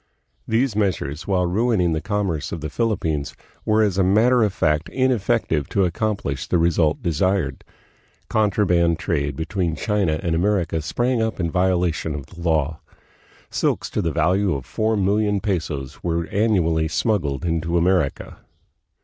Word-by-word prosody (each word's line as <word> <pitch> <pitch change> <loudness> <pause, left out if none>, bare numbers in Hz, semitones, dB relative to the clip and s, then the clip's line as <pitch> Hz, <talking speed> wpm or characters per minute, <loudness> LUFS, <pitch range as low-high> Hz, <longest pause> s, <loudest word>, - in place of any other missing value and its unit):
These 115 0 +1
meas 100 -4 +1
ures, 70 +4 -6
while 95 -2 +2
ruining 95 -2 +1
the 80 - -2
commerce 100 -8 -2
of 85 - -5
the 75 +1 -5
Philippines, 80 -11 -1 0.3
were 110 0 +3
as 100 -2 0
a - - +4
matter 115 +6 +4
of 105 -2 +2
fact 75 -4 0
ineffective 120 - 0
to 100 -2 +2
accomplish 90 - -2
the - - +2
result 80 -2 +1
desired. 85 -3 0 0.6
Contraband 90 -6 +2
trade 70 -4 -1
between 80 +1 -2
China 95 -4 0
and 85 - 0
America 85 -2 +1
sprang 120 +9 0
up 110 -2 -2
in 85 -3 -1
violation 90 -4 0
of 70 -3 -6
the 85 +3 -13
law. 80 -2 0 0.7
Silks - - -1
to - - -1
the 85 -4 -1
value 90 +3 +1
of 65 - -6
four 110 0 0
million 105 +1 +1
pesos 80 - -3
were 85 -1 -1
annually 90 -7 +1
smuggled 85 - -1
into 85 0 0
America. 85 -4 0
90 Hz, 150 wpm, -22 LUFS, 80-105 Hz, 0.7 s, a